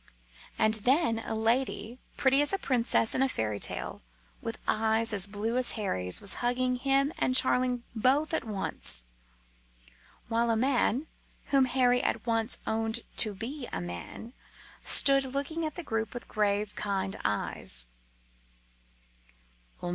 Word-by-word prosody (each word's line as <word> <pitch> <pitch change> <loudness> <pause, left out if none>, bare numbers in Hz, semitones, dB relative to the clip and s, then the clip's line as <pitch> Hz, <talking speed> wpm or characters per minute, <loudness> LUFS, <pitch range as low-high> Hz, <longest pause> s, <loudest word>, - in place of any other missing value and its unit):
And 220 -1 +2
then 260 -3 +2
a 225 - -4
lady, 230 0 -1 0.2
pretty 270 0 +3
as 290 - +1
a 390 - +1
princess 240 -7 +1
in - - 0
a 270 - +2
fairy 105 - -2
tale, - - -3 0.4
with 230 -1 -4
eyes 220 +1 +3
as 200 -1 +2
blue 215 +4 -2
as 255 -1 -1
Harry's, 95 - 0
was 200 - +2
hugging 250 +1 0
him 275 +3 +1
and 255 - +1
Charling 250 -1 +3
both 270 +8 +2
at 320 - 0
once; 195 - 0 1.2
while 235 0 +1
a 230 - +2
man, 255 +2 +1 0.5
whom 270 -1 +5
Harry 250 -1 +2
at - - -2
once 225 0 0
owned 225 +1 -1 0.2
to 215 -3 +4
be 245 +6 -5
a - - -3
man, 90 - -7 0.5
stood 275 -1 +5
looking 280 +5 -2
at 305 - -8
the 350 - -6
group 225 -4 -3
with 245 - -7
grave, 210 0 -1
kind 195 -2 -2
eyes. 65 -10 -2
230 Hz, 140 wpm, -29 LUFS, 215-260 Hz, 1.2 s, whom